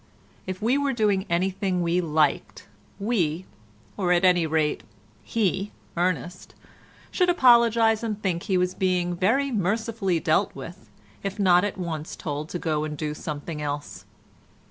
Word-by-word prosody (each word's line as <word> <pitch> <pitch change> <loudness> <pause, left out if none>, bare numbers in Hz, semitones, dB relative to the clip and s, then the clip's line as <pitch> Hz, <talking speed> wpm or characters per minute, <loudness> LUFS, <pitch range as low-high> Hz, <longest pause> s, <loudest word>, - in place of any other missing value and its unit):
If 185 +2 -5
we 250 +5 +3
were 280 -1 0
doing 205 -4 +1
anything 185 +1 0
we 170 +1 +1
liked, 155 -3 0 0.3
we, 185 -6 -1 0.5
or 185 -3 0
at 175 +1 +4
any 175 -3 +4
rate 155 -1 0 0.4
he, 200 -2 -1 0.2
Ernest, 180 0 -2 0.6
should 360 -2 +2
apologise 235 -7 +5
and 215 -3 -3
think 180 -4 -1
he 190 -1 0
was 180 0 +1
being 180 -2 0
very 240 +10 +1
mercifully 210 -2 0
dealt 155 -1 +1
with, 135 -4 -10 0.3
if 195 +1 -4
not 180 -3 +4
at 205 - -2
once 165 -4 -5
told 150 0 -5
to - - -3
go 155 -3 -1
and 150 -1 -4
do 150 0 -3
something 150 +1 -6
else. 145 0 -5
180 Hz, 145 wpm, -25 LUFS, 160-210 Hz, 0.6 s, apologise